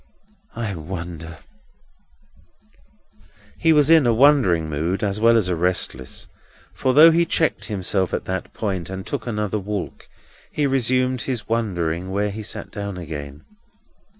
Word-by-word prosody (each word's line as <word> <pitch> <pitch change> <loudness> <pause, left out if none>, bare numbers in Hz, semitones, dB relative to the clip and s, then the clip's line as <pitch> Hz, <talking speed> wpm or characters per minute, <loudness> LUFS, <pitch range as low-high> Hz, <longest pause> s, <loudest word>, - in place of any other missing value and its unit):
I 115 -4 -3
wonder—" 85 -1 -7 2.2
He 165 - +3
was 150 0 +5
in 160 -6 +6
a 120 - +4
wondering 115 - +4
mood 80 +6 -2
as 100 0 -1
well 115 +1 +5
as 105 -5 +1
a 90 - 0
restless; 85 -7 -1 0.5
for, 130 -1 0
though 160 +3 +9
he 170 +1 +3
checked 165 -1 0
himself 95 -2 -1
at - - -3
that 95 -1 -4
point, 95 -5 -3
and 95 0 -6
took 125 -1 -5
another 105 -2 -2
walk, 100 -1 -5 0.4
he 150 - 0
resumed 130 -1 +1
his 120 -4 -3
wondering 90 -6 -1
when 100 +2 -1
he 110 +2 -6
sat 105 - -5
down 100 -3 -5
again. 75 -4 -8
100 Hz, 145 wpm, -22 LUFS, 90-125 Hz, 2.2 s, though